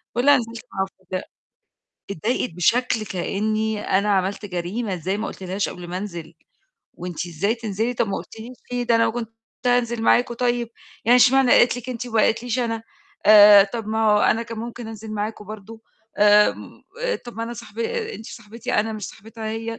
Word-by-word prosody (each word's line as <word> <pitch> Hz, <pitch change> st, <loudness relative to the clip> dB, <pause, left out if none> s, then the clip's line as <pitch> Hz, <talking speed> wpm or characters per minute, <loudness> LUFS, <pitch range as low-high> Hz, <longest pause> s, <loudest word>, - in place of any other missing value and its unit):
باقولها 280 Hz, +4 st, +5 dB
نزِلت 230 Hz, -1 st, -5 dB
مع 190 Hz, -, -2 dB, 0.2 s
واحدة 185 Hz, 0 st, -5 dB, 0.8 s
اتضايقت 215 Hz, +5 st, -1 dB
بشكل 225 Hz, +4 st, +1 dB
كأني 215 Hz, +3 st, -2 dB
أنا 200 Hz, +2 st, +1 dB
عملت 195 Hz, +2 st, 0 dB
جريمة 190 Hz, +4 st, -3 dB
إزاي 185 Hz, +4 st, -2 dB
ما 220 Hz, -, -3 dB
قُلتلهاش 190 Hz, +1 st, -3 dB
قبل 180 Hz, -1 st, -9 dB
ما 180 Hz, -, -3 dB
أنزِل، 175 Hz, -5 st, -7 dB, 0.7 s
وأنتِ 180 Hz, 0 st, -5 dB
إزاي 175 Hz, +6 st, -1 dB
تنزلي 225 Hz, +1 st, -2 dB
طب 225 Hz, -, 0 dB
ما 195 Hz, -, -2 dB
قُلتيليش 230 Hz, +3 st, -9 dB, 0.2 s
ليه؟ 245 Hz, 0 st, -1 dB
ده 235 Hz, -, +2 dB
أنا 230 Hz, 0 st, +3 dB
كنت 230 Hz, -1 st, -5 dB, 0.4 s
هانزِل 240 Hz, -2 st, +1 dB
معاكم 240 Hz, +1 st, +3 dB
طيب، 240 Hz, -1 st, 0 dB, 0.4 s
يعني 245 Hz, +1 st, +7 dB
اشمعني 260 Hz, 0 st, +5 dB
قالت 240 Hz, 0 st, +5 dB
لِك 250 Hz, +1 st, -10 dB
أنتِ 250 Hz, 0 st, -4 dB
وما 225 Hz, -2 st, +1 dB
قالتليش 235 Hz, +2 st, 0 dB
أنا، 230 Hz, -2 st, -2 dB, 0.4 s
آآ 205 Hz, -1 st, +9 dB
طب 220 Hz, +1 st, -6 dB
ما 220 Hz, 0 st, +1 dB
هو 210 Hz, -, +4 dB
أنا 225 Hz, +2 st, +2 dB
كان 230 Hz, -1 st, -7 dB
ممكن 235 Hz, 0 st, -6 dB
أنزِل 220 Hz, 0 st, -8 dB
معاكم 210 Hz, 0 st, -4 dB
برضه، 215 Hz, +2 st, -10 dB, 0.4 s
آآ 210 Hz, 0 st, +6 dB, 0.7 s
طب 240 Hz, -2 st, -10 dB
ما 225 Hz, -, -3 dB
أنا 235 Hz, +1 st, -4 dB
صاحب 215 Hz, -1 st, -11 dB
أنتِ 445 Hz, -, -3 dB
صاحبتي 230 Hz, +2 st, -6 dB
أنا، 220 Hz, +1 st, +1 dB
مش 215 Hz, -2 st, -6 dB
صاحبتها 225 Hz, +2 st, -11 dB
هي 225 Hz, +1 st, -5 dB
220 Hz, 175 wpm, -22 LUFS, 205-235 Hz, 0.8 s, آآ